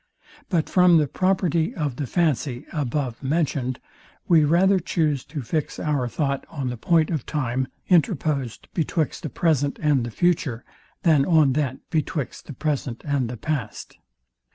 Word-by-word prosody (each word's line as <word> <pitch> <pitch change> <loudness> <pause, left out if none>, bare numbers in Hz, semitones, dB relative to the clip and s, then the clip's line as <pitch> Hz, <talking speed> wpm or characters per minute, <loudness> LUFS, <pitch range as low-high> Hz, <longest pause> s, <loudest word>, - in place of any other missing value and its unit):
But 170 -5 +1
from 180 -2 +5
the 155 - +3
property 185 - +1
of 145 -6 -2
the 145 - -3
fancy 140 -6 0
above 135 -4 -2
mentioned 135 -3 -1 0.5
we 165 -3 +5
rather 185 +6 +4
chuse 155 -5 0
to 145 -2 -6
fix 155 +5 -2
our 145 -5 0
thought 140 +1 -1
on 140 -5 -3
the 125 - -3
point 160 +7 +2
of 155 -7 -1
time 130 -3 -1 0.2
interposed 155 - +1
betwixt 160 -2 -1
the 155 - -4
present 145 0 +1
and 145 -5 +2
the 120 - -3
future, 135 -4 0 0.4
than 155 -5 +5
on 155 -4 +4
that 135 -2 -2
betwixt 155 -4 -2
the 145 - -7
present 135 -4 -3
and 140 -5 0
the 125 - -6
past. 125 -2 -4
150 Hz, 155 wpm, -24 LUFS, 130-165 Hz, 0.5 s, from